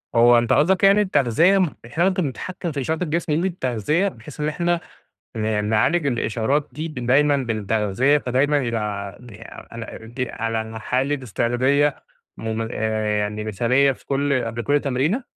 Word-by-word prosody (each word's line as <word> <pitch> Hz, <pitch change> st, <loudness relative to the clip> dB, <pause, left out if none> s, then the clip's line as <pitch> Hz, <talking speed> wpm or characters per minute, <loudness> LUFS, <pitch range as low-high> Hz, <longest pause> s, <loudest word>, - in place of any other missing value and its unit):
هو 120 Hz, +1 st, +6 dB
أنت 120 Hz, 0 st, +2 dB
قاصدك 185 Hz, +6 st, +3 dB
يعني 200 Hz, +1 st, +6 dB
التغذية 170 Hz, -, +3 dB
إحنا 140 Hz, +9 st, -1 dB
ممكن 185 Hz, -4 st, -1 dB
نتحكم 175 Hz, +6 st, -5 dB
في 140 Hz, -2 st, -3 dB
إشارة 160 Hz, +5 st, -1 dB
الجسم 160 Hz, -1 st, -1 dB
بالتغذية، 155 Hz, -, 0 dB
بحيث 150 Hz, -, -9 dB
إن 150 Hz, -, 0 dB
إحنا 175 Hz, +2 st, 0 dB, 0.6 s
ن 110 Hz, -1 st, 0 dB
نعالج 110 Hz, +10 st, +2 dB
الإشارات 125 Hz, +3 st, 0 dB
دي 155 Hz, +3 st, -5 dB
دايمًا 140 Hz, +1 st, +2 dB
بالتغذية، 110 Hz, +3 st, +1 dB
فدايمًا 140 Hz, +3 st, +1 dB
يبقى 105 Hz, -6 st, -2 dB
ع -, -, -17 dB
يعني 115 Hz, +2 st, -12 dB
على 110 Hz, -, -10 dB
دي 125 Hz, +2 st, -4 dB
على 115 Hz, 0 st, -2 dB
الحالة 125 Hz, +5 st, -2 dB
إستعدادية 130 Hz, +6 st, +1 dB, 0.3 s
مم 110 Hz, 0 st, -3 dB
يعني 105 Hz, -1 st, -1 dB
مثالية 125 Hz, +6 st, +2 dB
في 130 Hz, -, -11 dB
كل 140 Hz, -2 st, 0 dB
قبل 115 Hz, +1 st, -4 dB
كل 145 Hz, +4 st, +2 dB
تمرينة؟ 145 Hz, -, 0 dB
130 Hz, 150 wpm, -22 LUFS, 110-150 Hz, 0.6 s, هو